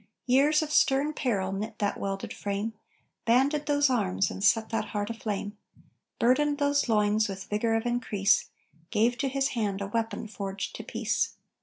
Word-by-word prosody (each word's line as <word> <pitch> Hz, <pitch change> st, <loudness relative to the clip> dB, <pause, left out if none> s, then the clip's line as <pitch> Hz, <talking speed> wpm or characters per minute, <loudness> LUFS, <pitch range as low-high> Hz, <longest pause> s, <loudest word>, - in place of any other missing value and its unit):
Years 285 Hz, +5 st, +4 dB
of 305 Hz, -, -5 dB
stern 280 Hz, +1 st, +3 dB
peril 200 Hz, -10 st, -1 dB
knit 215 Hz, +3 st, -4 dB
that 205 Hz, -1 st, -1 dB
welded 195 Hz, 0 st, -4 dB
frame, 205 Hz, +2 st, -3 dB, 0.5 s
Banded 275 Hz, +6 st, +2 dB
those 290 Hz, -1 st, +3 dB
arms 195 Hz, -7 st, +1 dB
and 195 Hz, -, -6 dB
set 220 Hz, +2 st, +3 dB
that 225 Hz, -, -1 dB
heart 205 Hz, +1 st, -3 dB
aflame, 210 Hz, -2 st, -4 dB, 0.6 s
Burdened 285 Hz, +5 st, +3 dB
those 285 Hz, -2 st, +1 dB
loins 210 Hz, 0 st, +3 dB
with 195 Hz, -1 st, -6 dB
vigor 225 Hz, +2 st, 0 dB
of 225 Hz, +1 st, -1 dB
increase, 215 Hz, -5 st, +1 dB, 0.4 s
Gave 230 Hz, +5 st, +2 dB
to 275 Hz, -, +1 dB
his 270 Hz, +1 st, 0 dB
hand 210 Hz, -7 st, -1 dB
a 200 Hz, -, -3 dB
weapon 220 Hz, +1 st, -2 dB
forged 195 Hz, -2 st, -5 dB
to -, -, -7 dB
peace. -, -, -1 dB
225 Hz, 165 wpm, -28 LUFS, 205-265 Hz, 0.6 s, Years